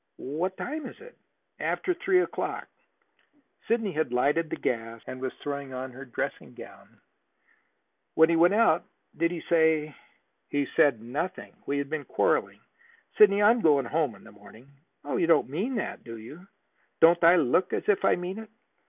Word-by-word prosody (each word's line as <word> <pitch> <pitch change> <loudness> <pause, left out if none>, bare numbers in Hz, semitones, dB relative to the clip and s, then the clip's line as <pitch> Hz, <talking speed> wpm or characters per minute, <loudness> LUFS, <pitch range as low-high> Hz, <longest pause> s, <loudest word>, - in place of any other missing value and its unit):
"What 170 +8 -3
time 300 0 -5
is - - -12
it?" 480 +2 -14 0.4
"After 365 - -1
three 365 +1 +2
o'clock." - - -4 1.0
Sidney 225 -3 0
had 155 -6 -2
lighted 145 +6 +1
the - - -3
gas 115 -1 -3
and 130 - -8
was 130 - -2
throwing 140 -2 -5
on 130 0 -5
her 130 +2 -10
dressing 125 - -5
gown. - - -14 1.2
"When 160 0 +6
he 170 - +2
went 175 +4 +4
out 210 -7 +3 0.3
did 170 - +1
he 170 -2 -5
say 160 -3 +2 0.3
" - - -49
"He 145 -1 0
said 140 -9 +3
nothing. 150 +10 -5
We 140 - -1
had 140 0 -2
been 155 -2 -3
quarreling. - - 0 0.6
Sidney, 205 -1 +6
I 210 - +7
am 235 0 0
going 145 - +3
home 150 -3 -1
in - - -18
the - - -14
morning." 110 +6 -17 0.4
"You 145 +3 0
don't 165 -5 +3
mean 200 - -2
that, 210 - -4
do 115 -1 -9
you?" 150 - -12 0.5
"Don't 170 +1 +5
I 170 +2 +7
look 175 +4 +2
as - - -3
if 205 - +2
I - - +4
mean 180 +4 -5
it? 220 -1 -10
160 Hz, 180 wpm, -27 LUFS, 135-190 Hz, 1.2 s, I